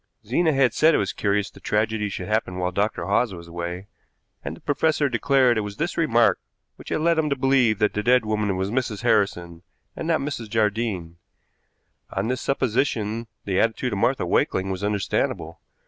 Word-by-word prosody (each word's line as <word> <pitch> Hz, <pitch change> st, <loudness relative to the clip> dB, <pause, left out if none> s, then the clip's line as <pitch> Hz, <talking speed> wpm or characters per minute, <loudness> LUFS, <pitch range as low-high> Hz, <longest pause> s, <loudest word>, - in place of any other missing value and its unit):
Zena 160 Hz, +9 st, +2 dB
had 135 Hz, -4 st, +3 dB
said 160 Hz, 0 st, +4 dB
it -, -, +4 dB
was 100 Hz, 0 st, -1 dB
curious 100 Hz, 0 st, 0 dB
the -, -, -15 dB
tragedy 105 Hz, 0 st, 0 dB
should 95 Hz, -2 st, -5 dB
happen 105 Hz, -4 st, -1 dB
while 90 Hz, 0 st, -1 dB
Dr. 100 Hz, +4 st, -1 dB
Hawes 115 Hz, -6 st, +1 dB
was 85 Hz, -1 st, -11 dB
away, 85 Hz, +2 st, -5 dB, 0.6 s
and 80 Hz, +3 st, -5 dB
the -, -, -18 dB
professor 150 Hz, 0 st, +1 dB
declared 125 Hz, -1 st, +3 dB
it -, -, 0 dB
was 105 Hz, 0 st, -6 dB
this 170 Hz, +3 st, -2 dB
remark 120 Hz, -8 st, +3 dB, 0.4 s
which -, -, -12 dB
had -, -, -1 dB
led 165 Hz, 0 st, +3 dB
him 155 Hz, -1 st, +1 dB
to 140 Hz, -, +1 dB
believe 130 Hz, -5 st, +3 dB
that 105 Hz, 0 st, +1 dB
the 105 Hz, -, -1 dB
dead 125 Hz, +1 st, +3 dB
woman 105 Hz, -3 st, 0 dB
was 95 Hz, +2 st, -2 dB
Mrs. 120 Hz, -3 st, -2 dB
Harrison 95 Hz, -7 st, +1 dB, 0.3 s
and -, -, -5 dB
not 165 Hz, -1 st, +2 dB
Mrs. 135 Hz, -6 st, -4 dB
Jardine. 105 Hz, -6 st, -1 dB, 1.0 s
On 100 Hz, +4 st, -1 dB
this 130 Hz, 0 st, -2 dB
supposition 115 Hz, -4 st, -1 dB, 0.2 s
the 95 Hz, -2 st, 0 dB
attitude 115 Hz, +1 st, 0 dB
of 100 Hz, -, -2 dB
Martha 130 Hz, -1 st, +1 dB
Wakeling 95 Hz, +2 st, +1 dB
was 95 Hz, +1 st, -4 dB
understandable. 105 Hz, -1 st, -2 dB
110 Hz, 190 wpm, -24 LUFS, 100-130 Hz, 1.0 s, said